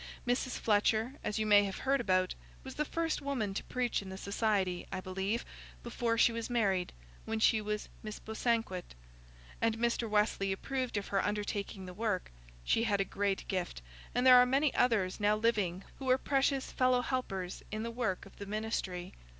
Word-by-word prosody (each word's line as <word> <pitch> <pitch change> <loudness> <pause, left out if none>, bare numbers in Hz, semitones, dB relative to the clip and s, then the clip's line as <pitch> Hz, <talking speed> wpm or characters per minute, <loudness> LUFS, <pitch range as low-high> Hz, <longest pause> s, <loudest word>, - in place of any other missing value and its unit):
Mrs. 245 +1 0
Fletcher, 220 +3 +2
as 210 - -2
you 215 - 0
may 205 -1 +7
have 195 - -4
heard 275 0 +1
about, 185 -4 +2 0.3
was 265 - -7
the 300 - -1
first 330 +1 -1
woman 255 -8 -2
to - - -3
preach 250 -3 -1
in 195 - -9
the 190 - -6
Society, 200 -3 0
I - - -2
believe, 190 +4 -2 0.4
before 235 -1 -1
she 235 - +5
was 230 +1 -4
married, 195 -7 +1 0.3
when 225 0 -2
she 220 0 +4
was 210 0 -3
Miss 215 -1 -6
Bosanquet; 220 - -2 0.7
and 225 -1 +2
Mr. 235 0 0
Wesley 210 -2 +2
approved 255 +4 -2
of 200 - -3
her 195 -1 +1
undertaking 205 -2 -3
the 180 - -8
work. 205 -2 -2 0.3
She 225 - +2
had 205 -3 +1
a 195 - +2
great 200 0 -1
gift, 180 - -3 0.3
and 245 +1 +2
there 255 -1 +10
are 250 - +7
many 275 +3 +2
others 210 -7 +2
now 210 0 +3
living 205 -5 0 0.2
who 265 -1 -3
are 255 - +6
precious 270 0 +1
fellow 255 -1 +3
helpers 195 -9 -3
in 215 +1 -3
the 230 - -3
work 230 -7 -2
of 195 - -16
the 200 - -7
ministry. 195 -4 -3
215 Hz, 185 wpm, -33 LUFS, 195-245 Hz, 0.7 s, there